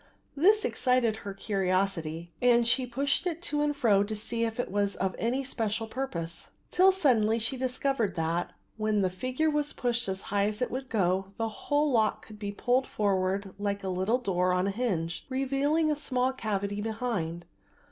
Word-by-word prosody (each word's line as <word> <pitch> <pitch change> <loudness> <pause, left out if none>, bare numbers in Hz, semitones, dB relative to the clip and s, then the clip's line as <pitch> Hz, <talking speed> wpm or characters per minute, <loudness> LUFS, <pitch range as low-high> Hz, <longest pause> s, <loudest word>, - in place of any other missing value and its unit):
This 410 +9 +4
excited 250 -4 +2
her 200 -2 -6
curiosity 185 -5 -1
and 240 -1 +4
she 250 +2 +2
pushed 275 +8 0
it 335 -2 -2
to 295 -2 0
and 295 0 +1
fro 210 -7 +4
to 215 +1 -4
see 230 +2 -2
if 225 +1 -4
it 245 - -2
was 200 0 +1
for 190 - 0
any 250 +4 0
special 225 -4 -2
purpose, 205 -9 -4 0.2
till 375 +2 +6
suddenly 235 - +3
she 230 +3 -1
discovered 255 -5 0
that, 165 +1 -1 0.3
when 215 -1 +1
the 185 -1 +1
figure 255 +11 0
was 295 -1 -1
pushed 240 -2 -1
as 190 0 -3
high 200 0 +3
as 210 0 -3
it 250 - -1
would 260 +1 -4
go, 190 -2 0
the 225 0 -1
whole 290 +6 0
lock 220 -3 +1
could 215 -1 -12
be 205 -1 -3
pulled 250 +5 +1
forward 195 -1 0
like 200 0 -2
a 190 - -2
little 190 +6 +1
door 185 -6 +1
on 180 +1 +1
a 200 - 0
hinge, 190 -7 -2
revealing 275 +4 +1
a - - +1
small 260 -3 0
cavity 205 -4 -2
behind. 210 -7 -3
220 Hz, 185 wpm, -29 LUFS, 195-260 Hz, 0.3 s, till